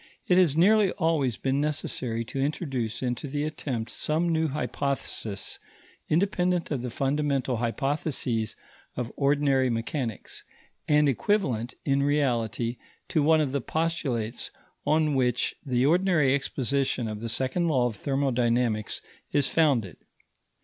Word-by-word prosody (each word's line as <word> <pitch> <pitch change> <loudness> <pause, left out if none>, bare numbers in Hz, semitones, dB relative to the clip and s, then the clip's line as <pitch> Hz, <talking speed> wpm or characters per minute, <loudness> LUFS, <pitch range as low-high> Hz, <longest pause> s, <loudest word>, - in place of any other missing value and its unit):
It 180 0 +5
has 160 -5 +3
nearly 205 +3 +5
always 155 -8 +1
been 135 +1 0
necessary 125 -6 -2
to 135 - -5
introduce 135 -5 -2
into 125 +3 -2
the 145 +2 -2
attempt 130 -7 -3
some 160 +3 0
new 160 -1 +2
hypothesis 140 -7 -3 0.5
independent 180 0 +1
of 135 -5 -1
the 125 - -3
fundamental 135 0 0
hypotheses 125 -2 -1 0.4
of 120 -2 -3
ordinary 140 -2 +2
mechanics, 115 0 -3 0.4
and 150 0 +4
equivalent, 130 - 0
in 140 -1 +2
reality, 120 -5 0 0.3
to 155 - +2
one 160 +2 +4
of 145 -4 0
the 140 0 -1
postulates 140 -8 -2 0.4
on 155 -1 +3
which 125 -3 +1
the 125 -3 +1
ordinary 165 -4 +3
exposition 135 -2 0
of 105 -1 -4
the 115 +1 -4
second 130 +9 0
law 130 -6 +2
of 120 -3 -1
thermodynamics 120 -4 0 0.3
is 145 -2 +3
founded. 130 - +2
135 Hz, 130 wpm, -27 LUFS, 120-155 Hz, 0.5 s, It